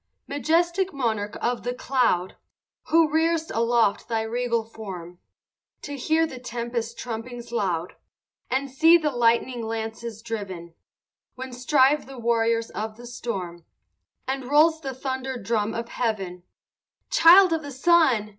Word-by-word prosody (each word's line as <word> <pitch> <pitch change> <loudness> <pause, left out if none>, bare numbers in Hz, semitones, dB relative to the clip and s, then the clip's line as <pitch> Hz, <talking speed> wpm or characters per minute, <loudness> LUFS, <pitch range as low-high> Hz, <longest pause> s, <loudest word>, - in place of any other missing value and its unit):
II 280 - -5
Majestic 345 +5 +1
monarch 220 -5 -2
of 245 0 0
the 245 +1 -3
cloud! 240 -10 0 0.5
Who 330 -1 +4
rear'st 320 +1 0
aloft 230 -2 +2
thy 225 -1 0
regal 235 0 -1
form, 185 -6 -9 0.6
To 285 - -5
hear 315 +4 +1
the 265 -6 -8
tempest 235 -1 -4
trumpings 235 0 -6
loud, 180 -7 -1 0.6
And 270 +1 -1
see 325 +5 +6
the 310 -3 -1
lightning 240 0 +1
lances 225 0 -5
driven, 190 -7 -6 0.6
When 260 0 -7
strive 270 +3 +3
the 270 -1 -10
warriors 230 -1 +1
of 215 0 -5
the 240 - -11
storm, 190 -8 -5 0.6
And 265 0 -2
rolls 315 +4 +4
the 270 -3 -5
thunder 260 0 -4
drum 215 0 -1
of 230 0 -4
heaven 195 -7 -3 0.7
Child 365 -4 +7
of 325 - 0
the 285 - -8
sun! 270 -6 +3
240 Hz, 135 wpm, -25 LUFS, 225-280 Hz, 0.7 s, Child